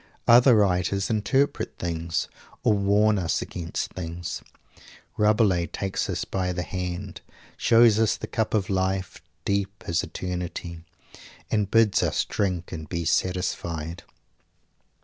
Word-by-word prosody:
Other 120 +1 +7
writers 100 0 +1
interpret 135 +7 0
things, 85 0 -2 0.4
or - - +4
warn 105 +1 +3
us 80 -5 0
against 85 -1 -5
things. 85 -1 -5 0.7
Rabelais 105 -5 +3
takes 95 +5 -3
us - - -2
by 90 -1 -2
the 90 0 -2
hand, 90 +1 -5 0.3
shows 115 -2 +5
us 110 -1 +2
the - - -5
cup 110 -1 -1
of 100 -3 +1
life, 95 -3 -1 0.2
deep 100 -1 -1
as 85 -1 +1
eternity, 90 -2 -5 0.7
and 105 -2 +1
bids 115 -2 +4
us - - +1
drink 90 -4 -2
and 80 -4 -7
be 85 -2 -3
satisfied. 85 -3 -1
95 Hz, 125 wpm, -25 LUFS, 85-105 Hz, 0.7 s, Other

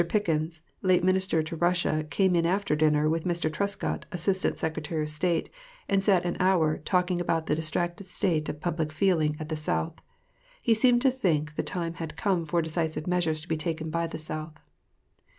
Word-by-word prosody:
Pickens, 160 -5 0 0.2
late 185 -2 +3
Minister 185 -3 +2
to 160 +2 -5
Russia, 175 -2 +1
came 185 +4 +2
in 170 - +3
after 185 -1 +1
dinner 150 0 +3
with 160 +1 0
Mr. 170 -3 0
Trescott, 200 +4 -2
Assistant 185 +1 0
Secretary 160 0 -2
of 150 - -2
State, 165 +2 0 0.4
and 195 -1 +2
sat 190 -3 +3
an 175 - -1
hour, 175 -5 +3
talking 180 +1 +1
about 165 -2 0
the - - 0
distracted 170 +4 -2
state 165 -4 0
of 150 - -5
public 160 -1 -2
feeling 155 -3 +2
at 155 0 -6
the 160 - -1
South. 80 - -2 0.6
He 230 - +3
seemed 240 +2 +4
to 265 - +5
think 155 - 0
the - - 0
time 170 -2 -2
had 160 - -6
come 180 -5 0
for 170 +2 +1
decisive 160 -1 -2
measures 175 -4 0
to 160 - -12
be 160 - 0
taken 160 0 -3
by 170 +1 0
the 160 - -6
South. 155 0 -6
165 Hz, 185 wpm, -27 LUFS, 155-180 Hz, 0.6 s, to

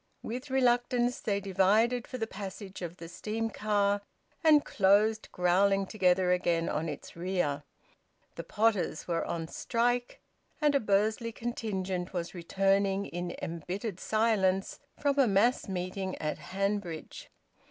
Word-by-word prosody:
With 250 +5 -5
reluctance 245 -1 +2
they 200 -2 0
divided 205 +5 +2
for 255 - -5
the 225 - -1
passage 195 -2 -8
of 175 0 -5
the 165 - -8
steam 220 +6 -3
car, 205 -1 +1 0.4
and 305 -2 +6
closed 210 +3 +3
growling 195 +2 +3
together 185 -3 +2
again 175 -2 +1
on 160 +2 -1
its 145 - -8
rear. 170 -5 -1 0.7
The - - -6
potters 210 -7 0
were 170 -1 0
on 165 -1 -3
strike, 245 +6 -1 0.4
and 295 -2 +3
a 280 - +4
Bursley 215 +2 +1
contingent 195 -6 -3
was 175 -2 -3
returning 195 +2 +1
in 175 0 -5
embittered 180 +4 -4
silence 205 -4 +1 0.2
from 285 -1 +1
a 270 - +6
mass 210 +5 +3
meeting 185 +1 -3
at 155 0 -3
Hanbridge. 195 -4 -3
195 Hz, 130 wpm, -30 LUFS, 180-225 Hz, 0.7 s, and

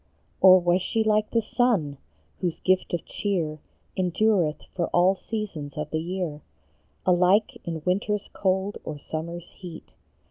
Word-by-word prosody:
Or 185 -1 +9
was 175 +1 +2
she 220 +4 0
like 215 0 +2
the 230 -1 +1
sun, 210 - +1 0.4
whose 175 -3 -2
gift 185 0 +1
of 175 - -2
cheer 165 -7 -2 0.4
Endureth 185 -3 +1
for 175 - -1
all 180 +2 +4
seasons 190 -10 -5
of 150 0 -4
the 155 - 0
year, 170 -3 -3 0.6
Alike 185 +4 +3
in 165 -2 -4
winter 200 +3 +1
s 205 - -6
cold 190 +1 0
or 155 - -5
summer 160 +3 -5
s 175 0 -13
heat? 175 -4 -10
180 Hz, 150 wpm, -26 LUFS, 165-200 Hz, 0.6 s, Or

